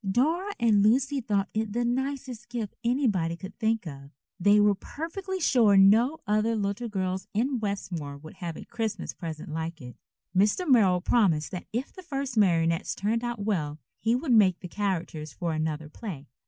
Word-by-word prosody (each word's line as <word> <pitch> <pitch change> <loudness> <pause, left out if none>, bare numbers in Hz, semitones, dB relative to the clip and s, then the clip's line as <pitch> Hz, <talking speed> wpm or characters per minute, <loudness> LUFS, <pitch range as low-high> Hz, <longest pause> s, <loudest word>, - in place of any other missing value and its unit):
Dora 325 - +1
and 220 -4 +4
Lucy 265 +6 +3
thought 205 -4 0
it 215 -1 -2
the 240 +1 0
nicest 260 -1 -3
gift 230 -4 -4
anybody 215 - +1
could 190 +2 -9
think 225 -2 +1
of. 140 -3 -8 0.3
They 205 +3 +5
were 205 0 +5
perfectly 345 - -5
sure 230 - +4
no 225 +10 +5
other 215 +2 +1
little 205 +3 -2
girls 185 -2 -2
in 250 +4 +1
Westmore 180 -9 -4
would 155 +5 -13
have 170 -3 -5
a - - -9
Christmas 225 -2 -3
present 160 -4 -7
like 160 +1 -4
it. 125 -3 -10 0.4
Mr. 210 - +2
Merrill 195 -9 +5
promised 175 - +2
that 180 - -6
if 240 +5 -3
the 370 - -10
first 275 -6 -4
marionettes 165 -5 +2
turned 225 +4 -1
out 240 -4 -3
well 155 -8 -1 0.2
he 230 +2 +2
would 255 0 0
make 190 -5 +5
the 180 - -6
characters 170 -6 -3
for 170 +4 -2
another 155 -1 -2
play. 155 -3 -7
210 Hz, 175 wpm, -27 LUFS, 175-240 Hz, 0.4 s, They